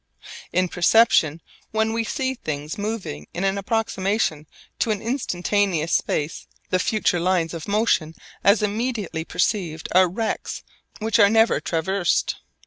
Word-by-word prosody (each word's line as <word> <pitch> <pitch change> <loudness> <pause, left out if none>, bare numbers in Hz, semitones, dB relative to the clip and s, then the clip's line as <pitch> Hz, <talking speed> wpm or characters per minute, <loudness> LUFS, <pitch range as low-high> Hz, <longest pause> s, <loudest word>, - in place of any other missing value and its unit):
In 185 +1 +2
perception 170 -4 +3 0.3
when 220 0 0
we 230 0 0
see 260 +3 -2
things 150 - -5
moving 205 - -4
in 180 - -2
an 195 0 +1
approximation 195 -6 -1 0.3
to - - +1
an 210 -2 0
instantaneous 200 - 0
space, 150 +2 -1 0.2
the 185 - +3
future 205 -2 +1
lines 175 -1 +1
of 165 -2 -6
motion 200 -7 +1 0.3
as 200 +1 +4
immediately 210 -5 -2
perceived 170 -3 -1
are 185 0 +5
rects 220 +5 -3 0.3
which 225 +1 0
are 200 -2 +7
never 225 +1 +4
traversed. 175 +2 0
195 Hz, 135 wpm, -23 LUFS, 170-220 Hz, 0.3 s, are